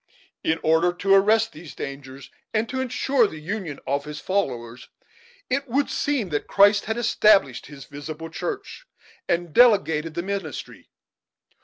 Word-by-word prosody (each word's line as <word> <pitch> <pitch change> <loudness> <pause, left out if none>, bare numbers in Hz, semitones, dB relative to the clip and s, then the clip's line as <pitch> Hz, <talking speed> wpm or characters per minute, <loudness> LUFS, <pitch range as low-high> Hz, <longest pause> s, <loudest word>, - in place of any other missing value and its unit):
In 160 +1 +1
order 160 +2 +3
to 195 +2 +1
arrest 215 +3 +4
these 160 0 -11
dangers, 135 -1 -8 0.2
and 220 +1 +1
to 260 0 -2
insure 255 -1 +1
the 160 - -9
union 170 -3 -5
of 140 +2 -1
his 150 0 -7
followers, 125 -11 -3 0.6
it 275 +2 -1
would 275 +4 0
seem 275 -9 -1
that 145 -2 -2
Christ 205 +1 +4
had 220 +1 -2
established 210 - +3
his 140 -1 -11
visible 155 +3 -8
church 440 - -6 0.4
and 170 -2 -1
delegated 165 -10 +4
the 170 - -2
ministry. 195 -5 -6
180 Hz, 145 wpm, -24 LUFS, 150-220 Hz, 0.6 s, arrest